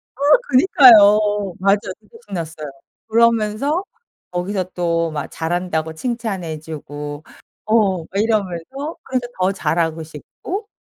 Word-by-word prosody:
아 -, -, -23 dB, 0.3 s
그니까요. 210 Hz, -, +6 dB
맞아. 195 Hz, +2 st, +3 dB, 0.2 s
진짜 455 Hz, -, -18 dB
신났어요. 160 Hz, -5 st, -6 dB, 0.4 s
그러면서 230 Hz, -, +2 dB, 0.5 s
거기서 185 Hz, +1 st, -2 dB
또 170 Hz, -2 st, 0 dB
막 150 Hz, -2 st, -4 dB
잘한다고 160 Hz, -1 st, -3 dB
칭찬해 195 Hz, -7 st, -4 dB
주고 145 Hz, -1 st, -8 dB, 0.4 s
어 210 Hz, -4 st, +2 dB
막 160 Hz, -, -10 dB
이러면서 220 Hz, -, -2 dB
그래서 255 Hz, -2 st, -2 dB
더 185 Hz, +1 st, +2 dB
잘하고 165 Hz, -3 st, -1 dB
싶고 355 Hz, -, -7 dB
190 Hz, 255 characters per minute, -19 LUFS, 160-230 Hz, 0.5 s, 그니까요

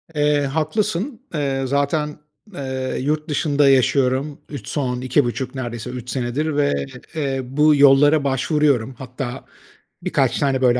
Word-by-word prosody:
Eee, 150 Hz, 0 st, +2 dB
haklısın. 170 Hz, -, -1 dB
Eee, 135 Hz, -3 st, -1 dB
zaten, 145 Hz, +3 st, 0 dB, 0.4 s
eee, 130 Hz, -4 st, -3 dB
yurt 150 Hz, +3 st, -1 dB
dışında 145 Hz, -1 st, +2 dB
yaşıyorum 135 Hz, +2 st, +2 dB
3 140 Hz, -8 st, -8 dB
son 125 Hz, -4 st, -2 dB
2,5 130 Hz, 0 st, 0 dB
neredeyse 120 Hz, -2 st, -5 dB
3 125 Hz, -1 st, -7 dB
senedir 135 Hz, +5 st, -2 dB
ve, 70 Hz, -, +1 dB, 0.3 s
eee, 140 Hz, -4 st, -1 dB
bu 150 Hz, +4 st, +3 dB
yollara 145 Hz, +2 st, +6 dB
başvuruyorum. 135 Hz, -2 st, +1 dB
Hatta 130 Hz, 0 st, -6 dB, 0.6 s
birkaç -, -, +1 dB
tane 135 Hz, -2 st, +1 dB
böyle, 125 Hz, -1 st, +4 dB
140 Hz, 130 wpm, -21 LUFS, 130-150 Hz, 0.6 s, yollara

